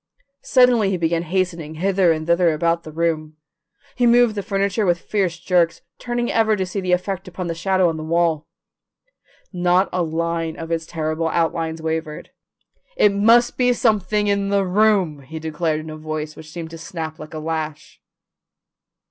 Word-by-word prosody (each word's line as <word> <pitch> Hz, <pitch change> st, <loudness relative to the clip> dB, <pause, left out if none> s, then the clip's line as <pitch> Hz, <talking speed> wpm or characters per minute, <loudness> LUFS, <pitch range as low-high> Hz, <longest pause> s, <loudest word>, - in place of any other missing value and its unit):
Suddenly 250 Hz, -5 st, +4 dB
he 190 Hz, -, 0 dB
began 165 Hz, 0 st, 0 dB
hastening 170 Hz, -3 st, -2 dB
hither 185 Hz, +1 st, +2 dB
and 155 Hz, -1 st, -2 dB
thither 170 Hz, 0 st, +3 dB
about 170 Hz, +2 st, 0 dB
the 155 Hz, -, -10 dB
room. 155 Hz, -1 st, -2 dB, 0.6 s
He 245 Hz, -1 st, +2 dB
moved 240 Hz, -1 st, +5 dB
the 205 Hz, -, -3 dB
furniture 200 Hz, +2 st, -1 dB
with 175 Hz, -3 st, +2 dB
fierce 185 Hz, -3 st, -1 dB
jerks, 175 Hz, -1 st, +1 dB, 0.2 s
turning 240 Hz, 0 st, -2 dB
ever 220 Hz, -1 st, +3 dB
to 190 Hz, -2 st, -1 dB
see 190 Hz, +2 st, -4 dB
the 185 Hz, -1 st, -2 dB
effect 185 Hz, +1 st, -1 dB
upon 180 Hz, 0 st, -5 dB
the 170 Hz, -, -2 dB
shadow 185 Hz, +2 st, +1 dB
on 165 Hz, -1 st, -1 dB
the 155 Hz, -, -5 dB
wall. 165 Hz, -1 st, 0 dB, 1.1 s
Not 180 Hz, +1 st, +2 dB
a 180 Hz, -, 0 dB
line 165 Hz, 0 st, -2 dB
of 165 Hz, 0 st, -7 dB
its 165 Hz, -1 st, -2 dB
terrible 160 Hz, 0 st, -2 dB
outlines 165 Hz, 0 st, -1 dB
wavered. 160 Hz, -1 st, -4 dB, 0.7 s
"It 205 Hz, -, +4 dB
must 230 Hz, +4 st, +4 dB
be 250 Hz, -1 st, +3 dB
something 210 Hz, -3 st, +1 dB
in 200 Hz, -1 st, 0 dB
the 200 Hz, -1 st, +2 dB
room!" 190 Hz, -5 st, +2 dB
he 140 Hz, +4 st, -9 dB
declared 155 Hz, 0 st, -2 dB
in 155 Hz, 0 st, -8 dB
a 155 Hz, -, -7 dB
voice 155 Hz, 0 st, -5 dB
which 155 Hz, -, -12 dB
seemed 160 Hz, 0 st, -7 dB
to 165 Hz, -, -9 dB
snap 160 Hz, -1 st, -6 dB
like 155 Hz, +1 st, -9 dB
a -, -, -4 dB
lash. 155 Hz, -1 st, -5 dB
170 Hz, 175 wpm, -21 LUFS, 160-195 Hz, 1.1 s, moved